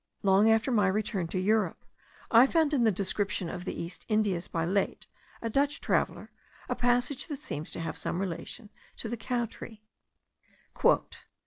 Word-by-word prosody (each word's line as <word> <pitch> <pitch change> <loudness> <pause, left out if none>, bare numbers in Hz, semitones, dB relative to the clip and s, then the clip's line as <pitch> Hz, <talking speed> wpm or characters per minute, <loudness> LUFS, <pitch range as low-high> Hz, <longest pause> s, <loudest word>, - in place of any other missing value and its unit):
Long 200 +2 +5
after 225 +4 +3
my 210 -5 +3
return 195 -2 -1
to 175 - -4
Europe, 200 -1 +1 0.5
I 235 +3 +8
found 315 -1 +2
in 250 -5 +3
the 220 - +5
Description 195 -1 -1
of 180 - -6
the - - -4
East 170 +2 -5
Indies 205 -5 +1
by 165 -1 -1
Laet, 195 +3 0 0.4
a - - 0
Dutch 285 +4 +1
traveller, - - -1 0.4
a - - 0
passage 245 +2 +1
that 295 -4 -4
seems 155 - -5
to - - -7
have 165 -1 -4
some 175 - -2
relation 195 +4 -5 0.3
to - - -5
the 235 - -2
cow 240 +1 -1
tree. 220 -1 -10
215 Hz, 170 wpm, -29 LUFS, 190-240 Hz, 0.5 s, I